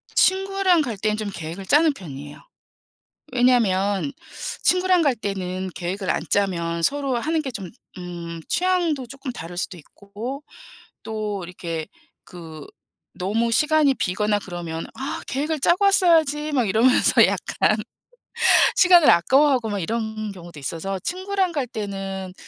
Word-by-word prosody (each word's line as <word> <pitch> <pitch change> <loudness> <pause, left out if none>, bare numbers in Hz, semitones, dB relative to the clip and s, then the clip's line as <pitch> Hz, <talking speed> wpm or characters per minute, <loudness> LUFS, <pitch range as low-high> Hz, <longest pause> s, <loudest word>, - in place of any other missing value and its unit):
친구랑 385 -2 +3
갈 240 -8 -3
땐 215 +2 -1
좀 215 -1 -3
계획을 170 +4 -7
짜는 300 - +4
편이에요. 145 - -10 0.9
왜냐하면 225 -3 +2 0.5
친구랑 365 -1 +3
갈 280 -5 +2
때는 190 -3 -4
계획을 185 +2 -3
안 - - 0
짜면 170 -4 0
서로 275 +4 0
하는 315 +6 -1
게 270 - -4
좀 200 -8 -7 0.3
음. 170 -2 -7
취향도 350 -7 0
쪼끔 270 +1 -7
다를 175 -6 -8
수도 180 +1 -3
있고. 210 - -8 0.6
또 210 -3 -4
이렇게 170 -2 -5 0.4
그 160 -4 -11 0.5
너무 225 +5 -1
시간이 300 +1 +3
비거나 210 0 0
그러면 175 -4 -6
"아. 270 +1 -5
계획을 300 +3 -2
짜고 345 +8 +3
왔어야지." 320 -6 +3
막 255 -5 +1
이러면서 230 +6 +5
약간. - - 0 1.0
시간을 355 -4 +6
아까워하고 260 - +4
막 205 -1 -2
이런 220 +2 -3
경우도 175 -5 -11
있어서 165 +7 -4
친구랑 375 - -1
갈 285 -6 -2
때는 195 -4 -5
220 Hz, 280 characters per minute, -23 LUFS, 185-295 Hz, 1.0 s, 시간을